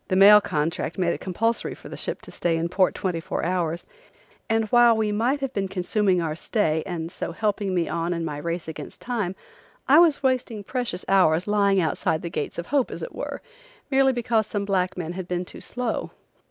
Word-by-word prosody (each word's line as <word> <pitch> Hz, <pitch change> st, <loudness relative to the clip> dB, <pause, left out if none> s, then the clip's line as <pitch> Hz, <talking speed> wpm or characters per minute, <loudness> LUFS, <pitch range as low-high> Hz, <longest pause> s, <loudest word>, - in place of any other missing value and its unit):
The 185 Hz, -, 0 dB
mail 205 Hz, +2 st, +9 dB
contract 160 Hz, -1 st, -2 dB
made 175 Hz, -2 st, +1 dB
it -, -, -5 dB
compulsory 225 Hz, +5 st, -1 dB
for -, -, -13 dB
the -, -, -7 dB
ship -, -, -4 dB
to -, -, -11 dB
stay 165 Hz, -1 st, 0 dB
in 165 Hz, +1 st, -1 dB
port 185 Hz, +1 st, +2 dB
twenty 180 Hz, -3 st, -2 dB
four 165 Hz, -, -3 dB
hours, 175 Hz, -2 st, -1 dB, 0.6 s
and 225 Hz, 0 st, +2 dB
while 240 Hz, -1 st, +6 dB
we 215 Hz, -1 st, +1 dB
might 245 Hz, +7 st, 0 dB
have 270 Hz, -1 st, -3 dB
been 195 Hz, -1 st, -1 dB
consuming 190 Hz, 0 st, +1 dB
our 160 Hz, -2 st, -2 dB
stay 160 Hz, -4 st, 0 dB
and 170 Hz, -2 st, -4 dB
so 175 Hz, -, -5 dB
helping 205 Hz, -1 st, -1 dB
me 170 Hz, -2 st, +1 dB
on 170 Hz, +1 st, -2 dB
in 170 Hz, -1 st, -2 dB
my 150 Hz, -2 st, -4 dB
race 170 Hz, +2 st, -4 dB
against 160 Hz, -, -8 dB
time 220 Hz, -7 st, -2 dB, 0.5 s
I 290 Hz, +4 st, +7 dB
was 325 Hz, -5 st, +4 dB
wasting 250 Hz, -5 st, 0 dB
precious 240 Hz, -5 st, -3 dB
hours 180 Hz, -3 st, +4 dB
lying 200 Hz, -2 st, +3 dB
outside 160 Hz, -1 st, 0 dB
the 170 Hz, -, -4 dB
gates -, -, -4 dB
of 170 Hz, -, -4 dB
hope, 275 Hz, -4 st, +3 dB
as -, -, -6 dB
it 485 Hz, -, -6 dB
were, -, -, -5 dB, 0.5 s
merely 270 Hz, 0 st, +4 dB
because 235 Hz, -3 st, 0 dB
some 205 Hz, -1 st, -2 dB
black 190 Hz, -2 st, 0 dB
men 170 Hz, -1 st, -4 dB
had 185 Hz, -1 st, -6 dB
been 180 Hz, 0 st, -2 dB
too -, -, -11 dB
slow. 245 Hz, -2 st, -3 dB
190 Hz, 210 wpm, -24 LUFS, 170-225 Hz, 0.6 s, mail